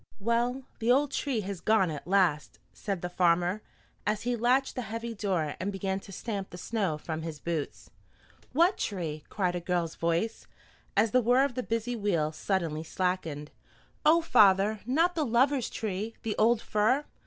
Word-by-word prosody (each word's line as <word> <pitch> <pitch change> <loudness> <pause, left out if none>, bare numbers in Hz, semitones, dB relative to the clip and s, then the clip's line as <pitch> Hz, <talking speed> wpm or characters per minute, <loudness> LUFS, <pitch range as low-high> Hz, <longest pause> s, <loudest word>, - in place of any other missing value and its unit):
"Well, 240 +5 0 0.2
the 230 +1 +2
old 280 +2 +3
tree 265 -7 -1
has 195 -2 -5
gone 205 -6 +3
at 150 +1 -7
last," 180 -6 +2 0.2
said 195 -4 -4
the - - 0
farmer, 175 +2 +2 0.4
as 210 0 -1
he 245 0 0
latched 250 +4 +2
the 250 - -3
heavy 230 +1 -4
door 185 -8 -1
and 190 +3 -2
began 195 0 -2
to 195 - -13
stamp 200 -1 -4
the 180 - -9
snow 190 -5 -1
from 160 +1 -5
his 160 -2 -6
boots. 165 -3 -4 0.6
"What 340 +7 +3
tree?" 160 -7 -3
cried 180 -3 0
a 175 - -2
girl's 175 -2 -1
voice, 170 +7 -1 0.5
as 215 +1 +4
the 255 - +4
whir 250 +4 +4
of 280 - -3
the 255 - -2
busy 230 +1 -2
wheel 175 -8 0
suddenly 165 -2 -2
slackened. 165 -4 -2 0.5
"Oh, 325 +2 +5
father, 205 -5 +4
not 330 +7 +3
the 320 - 0
Lovers' 260 +1 +2
Tree, 215 +1 -4
the 220 -2 -2
old 230 +1 +3
fir? 235 +8 +2
205 Hz, 175 wpm, -29 LUFS, 175-240 Hz, 0.6 s, Oh